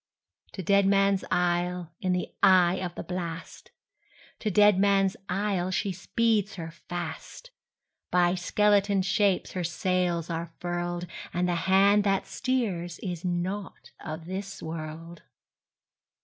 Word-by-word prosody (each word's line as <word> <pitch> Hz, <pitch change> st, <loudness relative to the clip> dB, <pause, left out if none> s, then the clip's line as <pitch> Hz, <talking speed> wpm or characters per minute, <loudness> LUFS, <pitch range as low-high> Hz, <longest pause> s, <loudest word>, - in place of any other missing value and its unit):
To 190 Hz, -, -5 dB
Deadman's 195 Hz, +1 st, +3 dB
Isle, 175 Hz, -1 st, 0 dB
in 185 Hz, -, 0 dB
the 180 Hz, 0 st, -2 dB
eye 185 Hz, -1 st, +5 dB
of 180 Hz, -2 st, -4 dB
the -, -, -5 dB
blast, 175 Hz, -2 st, -6 dB, 0.7 s
To 215 Hz, -, -1 dB
Deadman's 200 Hz, -1 st, +4 dB
Isle, 190 Hz, -1 st, 0 dB
she 195 Hz, +1 st, -1 dB
speeds 215 Hz, +3 st, 0 dB
her 165 Hz, -3 st, -6 dB
fast; 175 Hz, -, -7 dB, 0.6 s
By 175 Hz, -1 st, +3 dB
skeleton 200 Hz, +1 st, +2 dB
shapes 195 Hz, 0 st, +1 dB
her 180 Hz, -, -3 dB
sails 175 Hz, -1 st, 0 dB
are 170 Hz, 0 st, -4 dB
furled, 175 Hz, 0 st, -3 dB, 0.3 s
And 180 Hz, +1 st, +1 dB
the 175 Hz, -, +1 dB, 0.2 s
hand 200 Hz, +2 st, +5 dB
that 195 Hz, -1 st, +1 dB
steers 200 Hz, -10 st, -2 dB
is 175 Hz, -3 st, -4 dB
not 185 Hz, +3 st, -3 dB
of 160 Hz, 0 st, -6 dB
this 195 Hz, +2 st, -5 dB
world! 160 Hz, +1 st, -7 dB
180 Hz, 120 wpm, -27 LUFS, 175-200 Hz, 0.7 s, eye